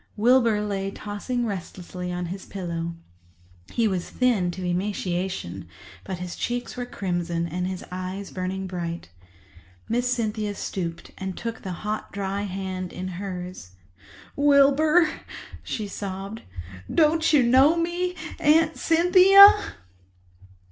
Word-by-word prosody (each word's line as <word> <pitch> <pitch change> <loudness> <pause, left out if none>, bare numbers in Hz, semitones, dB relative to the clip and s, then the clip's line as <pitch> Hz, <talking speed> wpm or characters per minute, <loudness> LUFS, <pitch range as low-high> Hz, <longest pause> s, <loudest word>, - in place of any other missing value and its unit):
Wilbur 230 -1 +4
lay 195 -1 -2
tossing 215 +5 -4
restlessly 180 -2 -5
on 180 0 -3
his 190 - -10
pillow. 170 -3 -4 0.8
He 230 -2 +2
was 185 -4 -2
thin 235 -8 +1
to 180 +1 -5
emaciation, 180 - -3 0.4
but 185 - -5
his 180 -1 -6
cheeks 245 0 -3
were 245 -1 -4
crimson 175 -5 -2
and 180 +2 -3
his 185 -1 -5
eyes 185 +2 -5
burning 190 +1 -3
bright. 170 - -5 0.8
Miss 245 +2 0
Cynthia 215 -3 -1
stooped 170 -4 -5
and 190 -1 -5
took 230 -1 -5
the 190 - -5
hot, 215 +1 -3
dry 200 0 -3
hands 185 -1 -4
in 185 +1 -5
hers. 180 - -7 0.6
"Wilbur," 290 +4 +5 0.5
she 215 -2 -4
sobbed, 195 +2 -6 0.5
"don't 320 0 +3
you 290 -5 +5
know 265 +7 +5
me—Aunt 335 -2 +1
Cynthia?" 370 +4 +8
200 Hz, 120 wpm, -25 LUFS, 180-250 Hz, 0.8 s, Cynthia